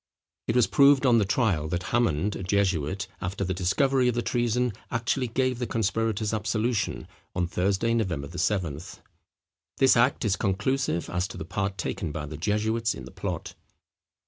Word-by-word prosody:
It 115 - 0
was 125 -2 +5
proved 140 -1 +5
on 120 -3 +5
the 105 - +2
trial 95 - +1
that 90 +2 -2
Hammond, 105 -5 +1
a - - -5
jesuit, 95 -2 0
after 100 +1 -3
the 95 0 -1
discovery 125 - +2
of 125 - +1
the 120 - 0
treason, 120 0 0 0.2
actually 125 +2 0
gave 130 +1 0
the 120 - -2
conspirators 110 0 0
absolution 110 +1 -1 0.3
on 90 -1 +1
Thursday, 100 +6 0
November 90 -11 -1
the 85 +3 -7
7th. 85 -4 -2 0.8
This 135 -2 +5
act 120 +1 +2
is 100 -3 +2
conclusive 105 -2 0
as 90 +2 0
to - - -9
the 80 - -5
part 95 +2 -2
taken 85 - -3
by 75 0 -4
the 75 +1 -7
jesuits 110 +6 0
in - - -8
the - - -11
plot. - - -5
105 Hz, 170 wpm, -27 LUFS, 90-120 Hz, 0.8 s, was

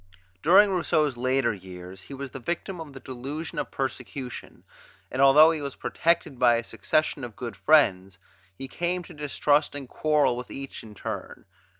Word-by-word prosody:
During 195 +5 +6
Rousseau's 155 -6 +1
later 130 -1 +1
years 90 -1 -10
he 140 - -10
was 135 -1 -6
the 135 - -7
victim 175 +5 -4
of 150 -3 -9
the 135 - -9
delusion 135 +6 -6
of - - -3
persecution; 130 -1 -6 0.5
and 130 - -1
although 150 +4 +8
he 160 -2 -3
was 140 -2 -5
protected 165 -6 0
by 120 -2 +5
a 115 - -1
succession 140 +5 0
of 120 -4 -7
good 120 -4 -6
friends, 95 -7 +3 0.4
he 135 - -7
came 175 +5 -2
to - - -12
distrust 145 0 +1
and 140 -2 -6
quarrel 150 -3 +2
with 125 +1 -7
each 135 0 -7
in 110 -2 -13
turn. - - -6
135 Hz, 175 wpm, -26 LUFS, 120-155 Hz, 0.5 s, although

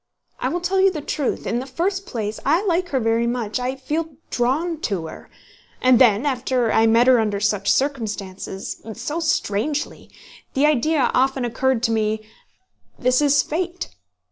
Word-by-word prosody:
I 255 - -1
will 345 +5 -2
tell 375 +2 +1
you 390 - +6
the 320 - -4
truth. 290 -2 -2
In 235 - -1
the 260 - -6
first 380 +7 -2
place 215 -3 -4
I 330 +9 +2
like 355 -1 +1
her 265 - 0
very 230 0 +1
much, 235 -1 -2
I 250 +1 -2
feel 305 +4 -3 0.2
drawn 300 +7 0
to 185 -6 -2
her; 160 - -10 0.5
and 255 -2 +5
then, 235 0 +5
after 255 -3 0
I 225 - +4
met 230 +2 +5
her 255 -2 +6
under 210 -2 0
such 205 -1 +1
circumstances—so 220 - -3
strangely, 300 -3 -1 0.5
the 275 +2 +3
idea 300 -1 +2
often 265 0 +2
occurred 250 0 0
to 230 - +2
me: 215 -1 0 0.7
'This 255 +2 +2
is 290 0 +4
fate. 345 - -3
255 Hz, 165 wpm, -22 LUFS, 225-300 Hz, 0.7 s, you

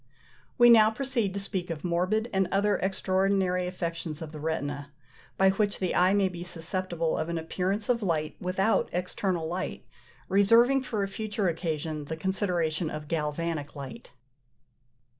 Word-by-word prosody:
We 240 -1 +8
now 220 -2 +8
proceed 235 -3 -1
to - - -1
speak 190 -2 -3
of 160 -3 -5
morbid 185 +6 +1
and 190 -1 +2
other 200 +1 +2
extraordinary 190 -1 +1
affections 170 -3 -4
of 160 -2 -7
the 155 - -8
retina, 145 -2 -3 0.5
by 190 0 +5
which 205 +1 0
the 185 -2 -1
eye 185 +2 +4
may 200 -1 +3
be 175 -2 -6
susceptible 175 -1 -2
of 160 - -2
an 170 - -1
appearance 185 +6 -2
of 240 -2 +1
light 155 -5 -1
without 190 +4 +1
external 180 -1 -1
light, 180 +3 -4 0.4
reserving 230 +7 +5
for 220 -5 -2
a - - -1
future 210 0 -2
occasion 160 -2 -3
the 160 +2 -5
consideration 175 -3 0
of 150 -1 -6
galvanic 155 -1 -2
light. 140 -2 -9
180 Hz, 155 wpm, -28 LUFS, 160-200 Hz, 0.5 s, We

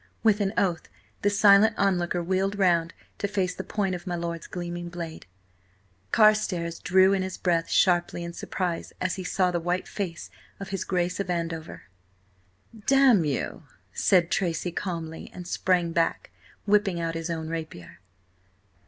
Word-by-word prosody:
With 215 -2 +4
an 195 -1 +1
oath 175 -4 0 0.3
the 205 - +3
silent 205 +1 +5
onlooker 180 -3 +1
wheeled 190 +3 0
round 170 -4 +2 0.2
to 200 - 0
face 190 -3 -1
the 190 - -6
point 195 -2 -1
of 180 +1 -6
my 175 - -1
lord's 170 -1 -4
gleaming 175 -1 -5
blade. 170 - -7 0.8
Carstares 210 -6 +3
drew 190 +1 +4
in 195 - +1
his 185 -1 -4
breath 170 -2 0
sharply 175 -1 +2
in 170 0 -6
surprise 175 -1 -3
as 185 +2 -1
he 185 - -4
saw 180 +1 +1
the 175 - 0
white 175 +2 -2
face 180 -5 -5 0.3
of 195 - -7
his 195 -2 -3
Grace 180 0 -1
of 195 -2 -3
Andover. 165 -2 -4 1.0
"Damn 270 - +5
you!" 140 -3 -3 0.3
said 175 -3 +3
Tracy 175 -1 -1
calmly, 165 -3 -5
and 180 -1 -8
sprang 180 -3 +1
back, 165 0 0 0.3
whipping 205 -3 +2
out 165 0 -2
his 165 +1 -4
own 160 -1 -3
rapier. 155 - -7
180 Hz, 155 wpm, -26 LUFS, 170-195 Hz, 1.0 s, silent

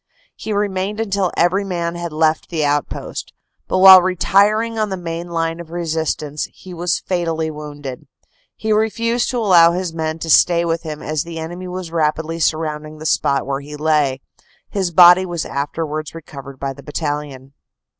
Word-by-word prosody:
He 220 - -6
remained 205 0 -1
until 200 -4 0
every 185 +4 +2
man 170 -3 -3
had 175 -1 -5
left 155 0 +1
the 160 -3 -1
outpost, 145 0 -3 0.3
but - - 0
while 190 0 +10
retiring 205 +5 +2
on 215 -1 0
the 190 - -3
main 170 0 -5
line 165 0 -2
of 170 -2 -9
resistance 160 -3 -2
he 185 - -12
was 175 0 0
fatally 165 -3 -2
wounded. 145 -2 -8 0.5
He 220 0 -1
refused 230 +2 0
to 250 - -2
allow 175 -7 +5
his 180 -2 -3
men 160 -1 -3
to 165 0 -6
stay 170 +2 +5
with 165 0 -1
him 155 -2 -7
as 155 -1 -2
the 170 -1 -8
enemy 175 +3 -6
was 180 -2 -6
rapidly 160 0 -1
surrounding 155 -1 -2
the 155 - -9
spot 140 -3 +1
where 135 0 -2
he 150 +1 -9
lay. 150 -3 +1 0.5
His 190 -3 -1
body 175 +2 +7
was 175 -3 -4
afterwards 155 +2 -4
recovered 140 -4 -10
by 135 -1 -3
the 140 - -13
battalion. 145 -3 -5
165 Hz, 170 wpm, -19 LUFS, 150-185 Hz, 0.5 s, while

